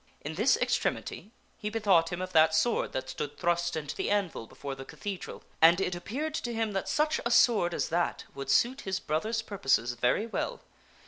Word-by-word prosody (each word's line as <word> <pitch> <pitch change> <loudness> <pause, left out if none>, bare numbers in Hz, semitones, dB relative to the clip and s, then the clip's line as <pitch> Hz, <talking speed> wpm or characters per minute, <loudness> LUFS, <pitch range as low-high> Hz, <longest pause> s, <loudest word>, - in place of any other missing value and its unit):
In 150 - -5
this 215 - +3
extremity 205 - -1 0.3
he 210 - -3
bethought 195 -7 +3
him 175 +1 -3
of 185 - -7
that 160 0 +5
sword 230 +8 +1
that 130 0 -3
stood 145 +2 -5
thrust 170 -1 0
into 150 -2 -4
the - - -2
anvil 195 - -1
before 140 +3 -7
the 135 0 -8
cathedral, 195 +6 -7 0.2
and 170 +2 +7
it 185 -2 0
appeared 260 - -4
to 240 -6 -3
him 225 -1 0
that 195 -1 -2
such 305 +1 +1
a 235 - 0
sword 220 -7 +4
as - - -2
that 170 +1 0
would 135 -1 -7
suit 240 - +3
his 190 -1 -2
brother's 215 +9 -1
purposes 135 - +1
very 125 - +1
well. 480 - -3
180 Hz, 195 wpm, -29 LUFS, 155-220 Hz, 0.3 s, and